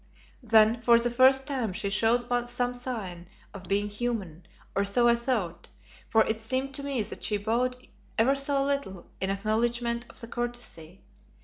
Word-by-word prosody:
Then 225 0 +4
for 235 0 +6
the 240 +1 0
first 265 +2 +5
time 255 -8 -2
she 200 +1 -2
showed 230 +4 +2 0.2
some 245 0 -1
sign 215 -9 -5 0.3
of 195 -2 -9
being 200 +2 0
human, 205 -7 -4 0.3
or 200 - +1
so 240 +5 +2
I 235 - +6
thought, 235 -8 -2 0.4
for 225 - +5
it 220 0 -2
seemed 260 +4 -2
to 280 - -5
me 275 -5 -1
that 205 - -8
she 210 - +1
bowed 235 +5 0 0.4
ever 240 +4 +4
so 275 0 +3
little 275 -10 -2
in 190 - -1
acknowledgment 235 +4 -1
of - - -8
the 230 - -8
courtesy. 240 -8 -6
235 Hz, 170 wpm, -28 LUFS, 205-245 Hz, 0.4 s, for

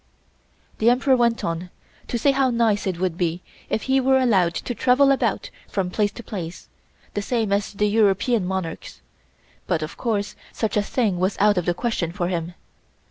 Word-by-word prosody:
The 225 - +4
Emperor 260 +2 +3
went 235 -2 +1
on 170 +2 -3 0.4
to 240 - -2
say 275 +5 +3
how 270 -1 +2
nice 225 -4 +1
it 180 -3 -2
would 180 -2 -1
be 175 0 -1 0.3
if 220 - -1
he 265 0 +2
were 265 +1 +4
allowed 195 -10 +2
to 245 - -3
travel 265 +3 +4
about 275 - 0 0.2
from 185 -3 -2
place 205 +1 +1
to 235 - -9
place 175 -6 -7 0.5
the 205 - -1
same 220 -1 0
as 200 +1 -1
the 210 +1 0
European 210 +1 +2
monarchs, 190 -3 -5 0.7
but 165 -4 0
of 155 - -7
course 210 -4 -2 0.2
such 220 - -2
a 210 - +3
thing 205 -3 0
was 185 +2 0
out 205 -2 +4
of 175 - -5
the 175 - +1
question 185 -6 -2
for 175 -1 -2
him. 175 -1 -3
205 Hz, 190 wpm, -23 LUFS, 180-235 Hz, 0.7 s, The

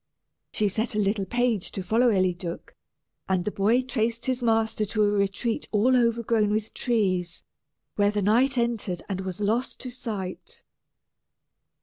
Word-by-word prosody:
She 210 - +1
set 220 +3 -1
a - - +1
little 200 -1 0
page 240 -3 +1
to 190 - -4
follow 230 +6 +3
Eliduc, 180 -4 -1 0.6
and 185 -2 +1
the 210 - -1
boy 220 +7 +2
traced 235 -2 -1
his 255 -1 -1
master 225 -2 +1
to 215 +1 0
a - - +4
retreat 205 +6 -1
all 230 +5 +3
overgrown 230 -3 +2
with 215 +1 -2
trees, 185 -8 -1 0.5
where 205 0 +4
the 205 -1 -1
knight 250 +6 +3
entered 225 -7 -1
and 190 -2 -3
was 185 0 -5
lost 225 +5 -1
to 255 - -5
sight. 210 -7 -6
215 Hz, 150 wpm, -26 LUFS, 195-235 Hz, 0.6 s, a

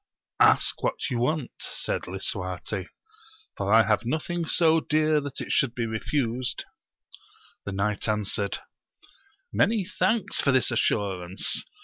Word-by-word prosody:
Ask - - +4
what - - -2
you 120 - -1
want, 140 +2 0
said - - -3
Lisuarte, 95 +1 -3 0.7
for 100 0 -2
I 110 0 +6
have 105 +1 +2
nothing 160 +7 -2
so 165 0 +4
dear 155 -1 +2
that 145 -2 -5
it - - -5
should 125 -3 +2
be 120 - -1
refused. 120 +2 -2 1.0
The 100 - -4
knight 100 +2 -1
answered, 105 -1 0 1.0
Many 200 - +2
thanks 215 +3 0
for 140 - +2
this 130 -1 +3
assurance 95 -5 +1
115 Hz, 125 wpm, -26 LUFS, 100-155 Hz, 1.0 s, I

